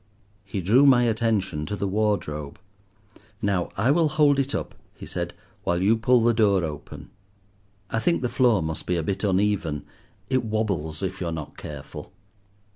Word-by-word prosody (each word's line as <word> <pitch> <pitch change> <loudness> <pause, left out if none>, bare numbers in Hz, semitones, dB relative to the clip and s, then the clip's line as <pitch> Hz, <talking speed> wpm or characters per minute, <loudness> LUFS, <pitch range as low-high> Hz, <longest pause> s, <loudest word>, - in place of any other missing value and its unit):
He 100 0 -4
drew 120 +11 +5
my 125 -3 +6
attention 105 -9 0
to 105 - -2
the 100 0 -2
wardrobe. 95 -8 -1 0.8
"Now 100 -5 0
I 115 +8 +3
will 160 0 +3
hold 145 -2 +3
it 140 0 0
up," - - -4 0.2
he - - -10
said, - - -4 0.3
"while 85 0 0
you 100 +5 +4
pull 120 +2 +3
the 120 0 +4
door 100 -5 +3
open; 75 -3 -7 0.8
I 115 - +1
think 170 +3 +1
the - - +2
floor 120 -7 +3
must 80 -1 -4
be 90 - +1
a 85 - -1
bit 95 +6 -2
uneven, 95 -6 0 0.4
it 130 -2 +1
wobbles 100 -8 -2
if 95 0 -3
you 90 - -1
are - - -2
not 80 -3 -6
careful." 75 -3 -9
100 Hz, 175 wpm, -25 LUFS, 85-120 Hz, 0.8 s, my